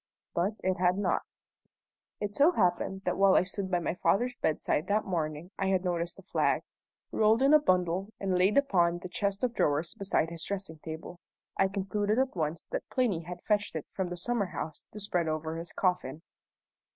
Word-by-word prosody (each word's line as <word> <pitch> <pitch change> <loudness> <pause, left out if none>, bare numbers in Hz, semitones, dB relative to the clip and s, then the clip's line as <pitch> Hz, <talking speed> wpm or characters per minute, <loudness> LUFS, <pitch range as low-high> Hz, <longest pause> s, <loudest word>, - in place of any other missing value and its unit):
But 190 +5 0
it 185 0 +1
had 180 +1 +2
not. 195 -3 +1 1.0
It 205 -1 -3
so 300 +9 +5
happened 190 - +1
that - - 0
while 195 -1 +5
I - - +5
stood 190 +1 -4
by 180 - +2
my 170 - -1
father's 245 +7 +1
bedside 155 -1 0
that 210 +1 +1
morning 160 -1 -3
I 195 - +1
had 190 -1 +1
noticed 175 0 -1
a - - -13
flag, - - +1 0.5
rolled 220 +3 +3
in 275 +2 +5
a 305 - +9
bundle 185 - +1
and 190 -2 0
laid 185 +5 +3
upon 175 -11 +3
the 180 +1 -8
chest 200 +2 -1
of 245 -2 +1
drawers 150 -4 +1
beside 185 -4 0
his 165 -1 -6
dressing 190 -5 -4
table. 160 +3 -8 0.4
I 195 - +3
concluded 205 +2 -1
at 260 -3 +1
once 155 -1 -2
that - - -4
Plinny 240 -10 +1
had 175 +1 -8
fetched 205 -4 0
it 155 - -3
from 190 -2 -2
the 175 - -5
summer 210 +2 0
house 160 -3 -6
to 210 - -8
spread 180 -5 -1
over 160 +1 -2
his 165 0 -6
coffin. 170 -5 -1
185 Hz, 195 wpm, -30 LUFS, 170-205 Hz, 1.0 s, a